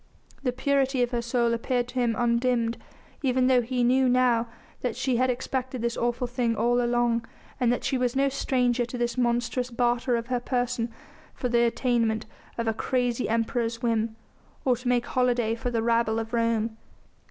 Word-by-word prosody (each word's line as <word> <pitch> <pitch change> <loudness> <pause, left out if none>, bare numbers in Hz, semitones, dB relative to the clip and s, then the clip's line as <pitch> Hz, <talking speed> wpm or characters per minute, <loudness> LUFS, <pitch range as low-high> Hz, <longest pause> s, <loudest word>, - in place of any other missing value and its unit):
The 255 - 0
purity 270 0 +1
of 240 - -2
her 240 -1 0
soul 235 0 +1
appeared 240 +1 -1
to 255 - -3
him 235 -2 +1
undimmed, 235 -1 +1 0.4
even 255 -2 +2
though 255 -1 +4
he 245 +1 -1
knew 255 +1 +4
now 245 -2 +3 0.3
that 245 -3 -2
she 255 -2 0
had 255 +1 +2
expected 255 0 -3
this 235 0 0
awful 240 +1 -1
thing 240 -2 -1
all 240 +3 +2
along, 240 -1 +1 0.4
and 245 -2 +3
that 245 - -1
she 260 - 0
was 250 0 0
no 275 +1 +3
stranger 250 -2 +1
to 240 +1 -5
this 240 0 -1
monstrous 245 0 0
barter 240 +1 +1
of 230 0 -2
her 250 0 -1
person 245 -2 -1 0.4
for 250 - -2
the 235 0 +3
attainment 230 -2 +1 0.3
of 230 -1 -2
a 225 - +2
crazy 245 +1 -1
Emperor's 230 +1 -1
whim, 225 -1 0 0.5
or 255 -2 +4
to 250 +1 -7
make 245 -1 +2
holiday 245 -3 +1
for 235 +2 -3
the 230 -2 -1
rabble 230 -1 +2
of 225 0 -4
Rome. 230 -1 0
240 Hz, 185 wpm, -26 LUFS, 235-250 Hz, 0.5 s, though